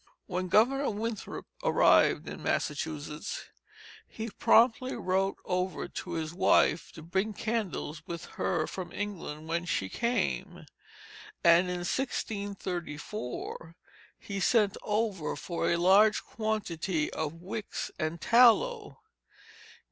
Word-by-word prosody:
When 185 -1 -2
Governor 260 +9 +3
Winthrop 220 0 -4 0.2
arrived - - +4
in - - -7
Massachusetts, 150 0 -3 0.6
he 225 0 -6
promptly 250 +5 +4
wrote 190 +1 0
over 180 0 -1
to - - -6
his 160 0 -3
wife 170 -2 +3
to 160 - -10
bring 190 +6 -1
candles 205 -9 -3
with 170 -1 -5 0.2
her 160 -3 +1
from 180 0 -6
England 170 -7 -5
when 170 +1 -1
she 95 - -1
came. 235 - -1 0.8
And 170 +1 +6
in 175 -1 -3
1634 185 - -4 0.4
he 200 -1 -5
sent 205 0 +3
over 210 -6 -1
for 170 - -2
a 170 - +2
large 200 +5 +5
quantity 190 -7 -2
of 155 0 -3
wicks 190 +6 -5
and 160 0 -2
tallow. 410 - +4
185 Hz, 110 wpm, -30 LUFS, 165-220 Hz, 0.8 s, And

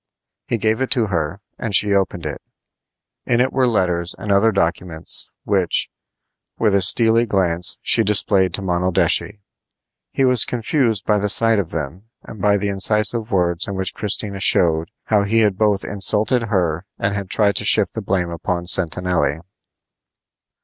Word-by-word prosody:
He 120 - -1
gave 110 +2 -1
it 130 - -1
to 120 -4 0
her, 90 -1 -4 0.2
and 110 -4 -3
she 105 +1 +3
opened 95 -4 -2
it. 75 -2 -6 0.9
In 120 - +1
it 130 +1 0
were 130 -1 +1
letters 90 -5 -1
and 105 - -5
other 100 +3 +3
documents, 85 -3 -3
which, 95 -4 -1 0.7
with 110 -3 +1
a 100 - +2
steely 115 +4 +3
glance, 90 -4 -1
she 115 - +4
displayed 100 -2 +2
to 100 - -5
Monaldeschi. 90 +3 0 0.7
He 135 - 0
was 125 -3 +5
confused 115 - -1
by 105 -1 +1
the 105 +1 -2
sight 115 +1 +4
of 90 -5 -4
them 80 +5 -6 0.2
and 105 - -11
by 100 +1 +2
the 100 0 -3
incisive 105 +3 +2
words 90 -4 0
in 100 - -5
which 95 0 -4
Christina 100 -1 -1
showed 80 -5 +2
how 105 -2 +1
he 110 +3 +1
had 105 -3 +1
both 105 -1 0
insulted 105 +4 +2
her 90 -3 -2
and 100 0 -2
had 100 -2 -5
tried 100 -2 +2
to - - +1
shift - - +3
the - - -5
blame 90 -3 -2
upon 85 +1 -4
Sentanelli. 85 -4 0
100 Hz, 165 wpm, -19 LUFS, 90-110 Hz, 0.9 s, was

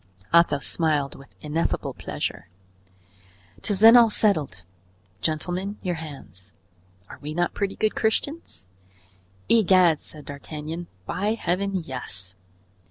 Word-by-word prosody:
Athos 170 -5 +4
smiled 150 -4 +1
with 135 - -15
ineffable 155 +2 -1
pleasure. - - -5 1.1
"'Tis 200 - 0
then 225 +2 +10
all 235 -2 +8
settled. 155 - +1 0.6
Gentlemen, 180 - -2
your 180 -2 0
hands; 105 - -8 0.5
are - - -11
we 150 +1 -6
not 175 0 0
pretty 200 -1 -2
good 215 -1 +1
Christians?" 230 - -2 0.8
"Egad!" 185 -7 +5
said 150 -2 -9
D'Artagnan, 155 +4 -6 0.2
"by 205 - -1
Heaven! 195 0 -1
yes." 125 - -5
165 Hz, 110 wpm, -25 LUFS, 145-200 Hz, 1.1 s, then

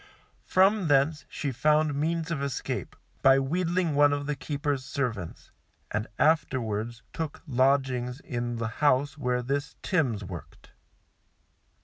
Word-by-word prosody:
From 190 0 +4
thence 145 +2 +2
she 140 - -3
found 150 +4 +2
means 160 +3 -1
of 155 -4 -1
escape 140 -3 -3 0.3
by 135 0 +6
wheedling 170 +4 0
one 145 0 +5
of 145 0 -2
the 150 0 -1
keeper's 145 -1 -2
servants, 125 - -4 0.4
and 105 +1 -1
afterwards 120 -7 +1
took 160 -3 -5
lodgings 130 -2 +1
in 120 -3 -3
the 115 0 -2
house 145 0 +3
where 125 -4 -1
this 140 +3 -2
Timms 130 - +1
worked. 90 -3 -10
140 Hz, 125 wpm, -28 LUFS, 125-155 Hz, 0.4 s, by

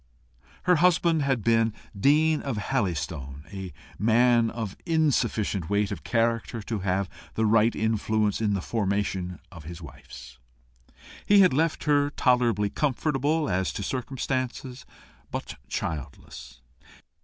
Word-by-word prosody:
Her 180 -1 +4
husband 170 -2 +3
had 135 -6 0
been 115 -1 +3 0.2
dean 150 +8 +3
of 135 -6 -3
Halystone, 75 - -3
a 95 -2 -6 0.3
man 115 +2 +4
of 110 -4 -5
insufficient 120 - 0
weight 100 0 +1
of - - -5
character 115 -1 0
to 110 +1 -3
have 95 0 0 0.3
the 110 - +1
right 110 +1 +3
influence 110 -1 0
in 105 -2 +1
the 95 - -2
formation 100 -4 -1
of 85 -5 -11
his 85 +1 -8
wife's. 80 -4 -12 0.9
He 205 -1 +7
had 185 -6 +5
left 160 +4 0
her 145 -1 +3
tolerably 120 -7 +2
comfortable 150 +2 0
as 95 0 0
to 100 - -4
circumstances, 130 +1 -3 0.4
but - - -6
childless. 65 -4 -6
115 Hz, 125 wpm, -26 LUFS, 100-135 Hz, 0.9 s, He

